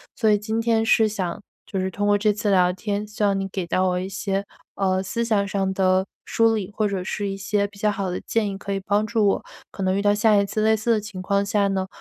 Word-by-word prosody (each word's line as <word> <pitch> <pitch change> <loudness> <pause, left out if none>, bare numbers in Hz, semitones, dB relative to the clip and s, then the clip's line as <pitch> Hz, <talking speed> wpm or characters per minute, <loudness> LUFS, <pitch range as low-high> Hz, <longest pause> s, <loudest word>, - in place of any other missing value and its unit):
所 220 -2 +2
以 210 - +5
今 220 +2 -2
天 225 -1 +2
是 225 -1 +4
想 195 -2 -3 0.2
就 195 - -4
是 190 0 -1
通 205 +3 -2
过 205 0 +4
这 210 0 +2
次 210 0 -2
聊 180 -1 +4
天， 205 +2 -3
希 210 0 -4
望 200 -1 +2
你 195 - -2
给 190 -2 -4
到 185 +2 +1
我 180 - 0
一 190 +1 -4
些， 195 0 -2 0.3
呃， 190 -1 +1
思 230 +5 -2
想 210 -3 +1
上 195 -1 -1
的 190 0 +2 0.2
梳 225 0 +3
理 200 -3 -3
或 215 - +1
者 195 -3 -1
是 200 +2 -3
一 195 - -4
些 200 +1 0
比 200 0 -10
较 210 +1 +2
好 195 -2 -2
的 - - -3
建 220 -3 -1
议 195 - -6
可 200 0 -4
以 195 - -1
帮 205 +2 +1
助 220 -1 +1
我， 200 - +1 0.3
可 195 - -8
能 185 0 +1
遇 200 - 0
到 205 0 +3
下 210 +1 +4
一 200 0 +3
次 215 +2 -2
类 220 +1 +4
似 220 +2 0
的 220 - +3
情 205 -3 -7
况 200 +1 +1
下 200 0 +1
呢， 190 -1 -1
200 Hz, 295 characters per minute, -23 LUFS, 190-215 Hz, 0.3 s, 以